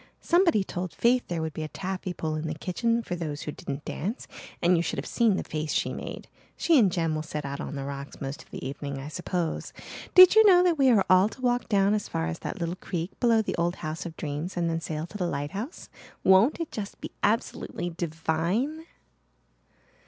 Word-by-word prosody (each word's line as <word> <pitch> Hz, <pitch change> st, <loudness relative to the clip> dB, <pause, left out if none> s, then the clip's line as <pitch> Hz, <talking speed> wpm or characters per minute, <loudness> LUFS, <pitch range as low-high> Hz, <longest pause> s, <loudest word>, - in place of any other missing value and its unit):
Somebody 340 Hz, -, +3 dB
told 180 Hz, -1 st, -5 dB
Faith 245 Hz, +1 st, +2 dB
there 170 Hz, -2 st, -2 dB
would 160 Hz, -1 st, -3 dB
be 155 Hz, -, -5 dB
a 155 Hz, -, -3 dB
taffy 190 Hz, +2 st, -4 dB
pull 160 Hz, -2 st, -3 dB
in 155 Hz, +1 st, -3 dB
the 155 Hz, -, -3 dB
kitchen 230 Hz, +8 st, 0 dB
for 180 Hz, -, -3 dB
those 155 Hz, -4 st, -4 dB
who 150 Hz, -, -4 dB
didn't 140 Hz, 0 st, -6 dB
dance 210 Hz, -, -4 dB, 0.3 s
and 175 Hz, +1 st, +4 dB
you 165 Hz, -, +2 dB
should -, -, -2 dB
have -, -, -3 dB
seen 230 Hz, -5 st, +2 dB
the -, -, -2 dB
face 155 Hz, -1 st, -3 dB
she -, -, 0 dB
made. -, -, -7 dB, 0.3 s
She 330 Hz, -4 st, +4 dB
and 200 Hz, -6 st, +4 dB
Jem 165 Hz, -2 st, 0 dB
will 155 Hz, -, -1 dB
sit 150 Hz, -2 st, -5 dB
out 140 Hz, 0 st, -4 dB
on -, -, -5 dB
the 140 Hz, -, -4 dB
rocks 140 Hz, 0 st, -7 dB
most 140 Hz, +3 st, -5 dB
of -, -, -19 dB
the -, -, -6 dB
evening, 140 Hz, 0 st, -5 dB
I 135 Hz, +2 st, -6 dB
suppose. 175 Hz, 0 st, -3 dB, 0.4 s
Did 370 Hz, 0 st, +10 dB
you 440 Hz, 0 st, +8 dB
know 365 Hz, -4 st, +7 dB
that 345 Hz, -4 st, +2 dB
we 270 Hz, -1 st, +6 dB
are 215 Hz, -6 st, +4 dB
all 185 Hz, +3 st, +5 dB
to 255 Hz, -, -13 dB
walk 245 Hz, -2 st, +1 dB
down 200 Hz, -1 st, +3 dB
as 210 Hz, -1 st, -1 dB
far 80 Hz, -, -1 dB
as 80 Hz, 0 st, -4 dB
that -, -, -5 dB
little 170 Hz, +1 st, -2 dB
creek 175 Hz, -1 st, -4 dB
below 230 Hz, -3 st, +4 dB
the -, -, -2 dB
old 170 Hz, +1 st, +1 dB
House 155 Hz, +2 st, -3 dB
of 165 Hz, -, -10 dB
Dreams 155 Hz, +5 st, -4 dB
and 170 Hz, -1 st, +1 dB
then 165 Hz, 0 st, -1 dB
sail 155 Hz, 0 st, -3 dB
to 210 Hz, +4 st, -9 dB
the 180 Hz, -, 0 dB
lighthouse? 170 Hz, -, -4 dB, 0.4 s
Won't 190 Hz, -, +5 dB
it 335 Hz, -, -4 dB
just 205 Hz, -2 st, -6 dB
be -, -, -7 dB
absolutely 205 Hz, -4 st, -1 dB
divine?" 170 Hz, -, -1 dB
175 Hz, 225 wpm, -27 LUFS, 155-220 Hz, 0.4 s, Did